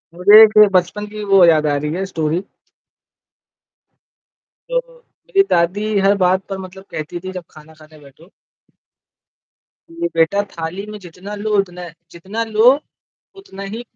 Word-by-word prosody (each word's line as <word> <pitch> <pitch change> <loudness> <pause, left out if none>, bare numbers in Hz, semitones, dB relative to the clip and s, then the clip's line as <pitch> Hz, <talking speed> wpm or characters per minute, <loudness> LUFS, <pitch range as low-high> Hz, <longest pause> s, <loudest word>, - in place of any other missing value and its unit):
मुझे 210 +3 +7
बचपन 185 +3 0
की 210 - -5
वो 195 -2 +6
याद 155 -2 +3
आ 145 - +1
रही 150 +2 -4
है 190 +2 -3
स्टोरी। 160 +2 -1 2.3
जब - - -2
मेरी 475 -5 -2
दादी 180 +5 0
हर 195 +1 +3
बात 185 +1 +2
पर 195 - -4
मतलब 190 0 -11
कहती 155 +3 -6
थी 185 +2 -8
जब 180 -2 -7
खाना 155 +1 -16
खाने 155 0 -18
बैठो 145 +5 -19 1.6
कि 335 +1 -4
बेटा 190 +5 +2
थाली 170 +5 -6
में 210 - -8
जितना 180 +3 -11
लो 210 +1 -5
उतना 180 -2 -2
है 170 -3 -9 0.2
जितना 195 +7 -5
लो 220 +1 +1 0.7
उतना 200 - -11
ही 230 +2 -6
185 Hz, 145 wpm, -18 LUFS, 165-210 Hz, 2.3 s, मुझे